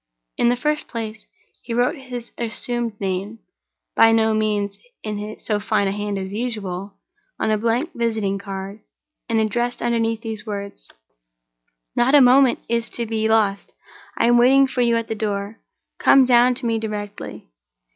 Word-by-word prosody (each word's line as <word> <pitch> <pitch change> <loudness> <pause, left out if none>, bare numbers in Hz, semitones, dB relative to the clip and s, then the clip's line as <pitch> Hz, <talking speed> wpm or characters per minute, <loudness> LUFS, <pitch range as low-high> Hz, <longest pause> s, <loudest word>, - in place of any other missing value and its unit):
In 240 - +3
the 245 - +3
first 300 +3 -1
place, 220 -2 -6 0.3
he 235 -1 -5
wrote 245 +6 +2
his 250 -4 -8
assumed 235 -1 -3
name 195 +3 -3 0.6
(by 225 - +6
no 220 -1 +3
means 210 -2 -1 0.2
in 210 0 -5
so 210 -2 -1
fine 210 -1 +1
a - - 0
hand 205 0 -3
as 190 0 -5
usual) 205 -4 -4 0.4
on - - +1
a 215 - +2
blank 235 +9 0
visiting 220 -4 -1
card, 195 +1 -7 0.5
and 225 -1 +2
added 240 +3 0
underneath 230 -1 0
these 220 -2 -5
words: 200 -2 -7 1.0
"Not 250 +4 +4
a - - +9
moment 255 0 +5
is 235 0 -1
to 235 - -1
be 220 -1 -1
lost. 210 -3 +1 0.4
I - - +3
am 240 0 +5
waiting 270 +3 +6
for 260 -1 -2
you 235 -1 +3
at 230 - -3
the - - -2
door—come 215 +5 0
down 245 0 +5
to 245 - -6
me 225 -1 +1
directly." 210 - -6
225 Hz, 160 wpm, -21 LUFS, 205-240 Hz, 1.0 s, a